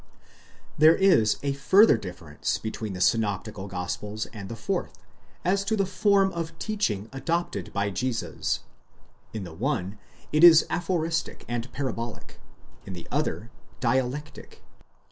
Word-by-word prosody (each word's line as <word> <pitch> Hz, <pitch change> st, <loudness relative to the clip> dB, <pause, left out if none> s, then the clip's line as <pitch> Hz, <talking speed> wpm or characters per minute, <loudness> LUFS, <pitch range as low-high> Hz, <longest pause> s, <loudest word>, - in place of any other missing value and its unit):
There 155 Hz, +2 st, +8 dB
is 175 Hz, -, +4 dB
a 140 Hz, -1 st, 0 dB
further 190 Hz, -, +6 dB
difference 90 Hz, -8 st, -4 dB
between 110 Hz, -2 st, -5 dB
the 90 Hz, -, -5 dB
synoptical 105 Hz, -1 st, 0 dB
gospels 105 Hz, +3 st, -4 dB
and 100 Hz, -3 st, -8 dB
the 115 Hz, -, -5 dB
fourth, -, -, -3 dB, 0.5 s
as 195 Hz, +3 st, +2 dB
to 220 Hz, -, +1 dB
the 195 Hz, -2 st, +1 dB
form 195 Hz, 0 st, +3 dB
of 165 Hz, -1 st, -5 dB
teaching 120 Hz, -, -1 dB
adopted 165 Hz, +6 st, -2 dB
by 100 Hz, 0 st, -1 dB
Jesus; 125 Hz, +3 st, -2 dB, 0.7 s
in 110 Hz, -3 st, -5 dB
the 85 Hz, -3 st, -8 dB
one, 105 Hz, -, -2 dB, 0.3 s
it 155 Hz, +2 st, +3 dB
is 165 Hz, -2 st, +9 dB
aphoristic 165 Hz, -1 st, -1 dB
and 120 Hz, +1 st, -4 dB
parabolic, 120 Hz, -4 st, -5 dB, 0.4 s
in 95 Hz, -, -8 dB
the 85 Hz, -, -9 dB
other, -, -, -2 dB, 0.3 s
dialectic. 130 Hz, +3 st, -2 dB
125 Hz, 130 wpm, -26 LUFS, 105-165 Hz, 0.7 s, is